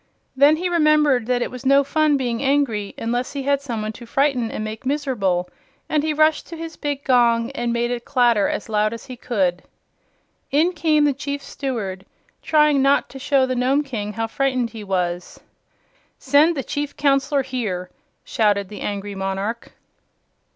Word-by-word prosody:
Then 285 +3 +6
he 355 +3 -2
remembered 305 -7 +3
that 245 -1 +1
it - - -5
was 255 0 -8
no 275 +1 +5
fun 305 0 +2
being 240 -3 -2
angry 265 -7 0
unless 240 +2 -2
he 280 -1 -4
had 280 0 +1
some 235 -6 -4
one 215 - -3
to 235 +2 -12
frighten 265 -3 +1
and 215 - -4
make 215 +2 -6
miserable, 250 -11 -1 0.4
and 305 - +1
he 310 +1 -1
rushed 310 +1 +2
to 335 - -8
his 325 0 -7
big 285 -1 -4
gong 235 -2 +3
and 240 -3 -2
made 235 +1 0
it 240 -1 -3
clatter 235 -6 +3
as - - -4
loud 215 0 +1
as 230 - -8
he 255 - -8
could. 190 -8 -1 0.9
In 320 +6 +2
came 310 -3 +2
the 290 -1 +3
Chief 280 +1 -5
Steward, 210 -9 -4 0.4
trying 300 -3 +3
not 275 +1 +3
to 270 - -10
show 275 -1 +2
the 255 - -2
Nome 260 +4 +2
King 210 -7 -5
how 225 +2 -2
frightened 255 0 -1
he 220 -2 -8
was. 180 -2 -3 0.8
"Send 290 +4 +3
the 270 - -2
Chief 290 +2 -4
Counselor 275 0 +2
here!" 215 -9 -4 0.3
shouted 205 -3 +1
the 210 - -9
angry 205 0 -4
monarch. 195 +4 -4
255 Hz, 180 wpm, -21 LUFS, 220-285 Hz, 0.9 s, Then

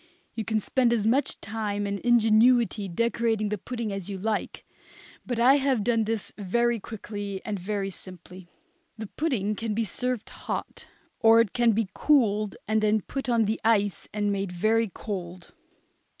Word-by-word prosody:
You 225 - -3
can 220 0 0
spend 240 +3 +1
as 215 -3 0
much 260 +6 +1
time 205 -1 -3
and 200 0 -3
ingenuity 230 -2 +3
decorating 225 +2 0
the 210 - -2
pudding 235 -1 -4
as 195 -1 -5
you 195 - -4
like, 215 +2 -3 0.6
but 245 - -2
I 255 +4 +6
have 265 -6 +1
done 230 -1 +2
this 225 -1 -2
very 235 +4 +1
quickly 205 -2 -6
and 210 -3 -3
very 195 +1 -3
simply. 185 0 -11 0.5
The 220 - -5
pudding 215 -5 -1
can 220 -1 -3
be 230 +1 0
served 250 +3 -3
hot, - - -6 0.3
or 225 0 +6
it 230 -4 +2
can 240 -2 +3
be 220 -1 0
cooled 215 -8 +2
and 215 0 +2
then 215 0 +2
put 270 +6 -5
on 230 -2 +3
the 220 +2 -2
ice 205 -3 +1
and 205 -1 -1
made 195 -2 -2
very 220 +5 +1
cold. 185 -3 -7
215 Hz, 165 wpm, -26 LUFS, 200-235 Hz, 0.6 s, I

